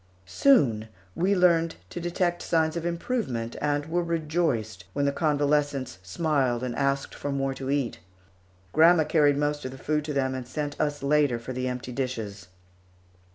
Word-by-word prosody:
Soon 115 - +3 0.3
we 190 - +1
learned 170 -3 +3 0.2
to - - -5
detect 175 0 -1
signs 160 -1 +1
of 170 0 -2
improvement, 170 - -2
and 145 0 0
were 170 +3 0
rejoiced 155 - -1
when 140 - 0
the 140 - +2
convalescents 145 - 0
smiled 130 - 0
and 125 -2 -3
asked 140 0 0
for 145 - -4
more 135 -1 -1
to 135 0 -6
eat. 140 -8 -1 0.7
Grandma 165 +1 +6
carried 150 -2 +3
most 145 0 -1
of 130 - -4
the 130 - -9
food 150 +2 -1
to 150 - -3
them 130 -1 0
and 130 -2 -5
sent 145 +2 -3
us 145 -1 -1
later 145 -3 +3
for 115 +2 -7
the 130 0 -2
empty 125 0 -4
dishes. 110 -7 -4
145 Hz, 165 wpm, -27 LUFS, 130-160 Hz, 0.7 s, Grandma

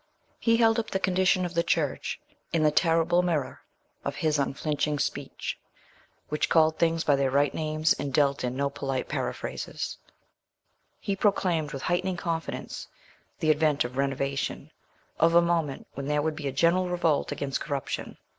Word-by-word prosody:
He 230 -1 +3
held 225 0 +4
up 220 - -3
the 190 - -1
condition 185 0 +2
of 175 - -5
the 170 - +2
Church 165 - -1 0.3
in 165 -2 +2
the 150 - +5
terrible 165 +2 +3
mirror 165 -6 -1 0.4
of - - -3
his 155 -2 +1
unflinching 145 +2 -1
speech, - - -3 0.7
which 150 - -1
called 160 -1 +4
things 165 0 +2
by 145 - +4
their 135 -1 +1
right 140 +1 +2
names 155 0 +1
and 140 - -4
dealt 140 -1 +2
in 125 0 -2
no 140 +1 0
polite 135 -2 -3
periphrases; - - -4 1.0
he 200 - -2
proclaimed 180 -6 +1
with 135 - -6
heightening 180 +1 0
confidence 165 -1 -4 0.5
the 155 - +4
advent 150 -1 +2
of 120 +1 -6
renovation—of 140 +4 -2
a - - +9
moment 170 -5 0
when 140 0 -5
there 150 0 +1
would 160 0 -1
be 150 -2 -4
a - - -1
general 170 +6 +2
revolt 170 -4 +1
against 135 -1 -2
corruption. 140 -3 -4
155 Hz, 160 wpm, -27 LUFS, 140-170 Hz, 1.0 s, a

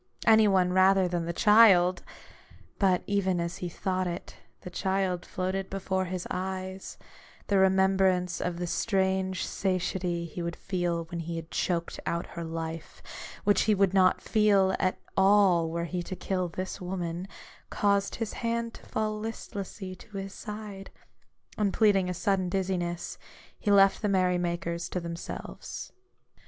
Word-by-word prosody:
Any 220 -1 +6
one 185 -2 +3
rather 190 0 +5
than 175 -1 -2
the 170 - -2
child! 190 -3 +6 0.8
But 185 -3 +3
even 190 -3 +1
as 170 +1 -3
he 180 - -4
thought 185 +2 -2
it, 175 +1 -6 0.3
the 180 - -8
child 190 -1 -1
floated 190 +1 -2
before 190 -1 -1
his 180 0 -4
eyes; 190 +1 -4 0.5
the 200 -1 +2
remembrance 190 -2 +3
of 180 -1 -2
the 175 - -2
strange 190 -1 0
satiety 180 -2 -1
he 170 +2 -6
would 170 0 -3
feel 175 -3 -2
when 170 - -3
he 165 0 -4
had 165 0 -7
choked 170 -2 -1
out 170 0 -1
her 170 - -5
life, 165 0 -6 0.4
which 205 0 +4
he 210 - +5
would 195 -1 +2
not 185 -1 +4
feel 200 -3 +3
at 185 -1 +1 0.2
all 190 -4 +4
were 170 +1 -2
he 175 +1 -3
to 185 - -6
kill 185 -1 -2
this 185 +3 -5
woman, 180 -1 -4 0.4
caused 200 -1 +1
his 225 -2 -4
hand 230 -1 -2
to - - -13
fall 215 -1 -2
listlessly 200 -3 -6
to 210 +2 -11
his 195 0 -5
side; 210 -3 -8 0.7
and 205 -2 +1
pleading 200 -4 +3
a - - -1
sudden 190 -1 0
dizziness, 175 -2 -2 0.4
he 210 - -2
left 195 -1 +5
the 210 - 0
merry 185 -2 +2
makers 170 -1 -2
to 180 - -2
themselves. 170 0 -7
185 Hz, 155 wpm, -28 LUFS, 175-195 Hz, 0.8 s, Any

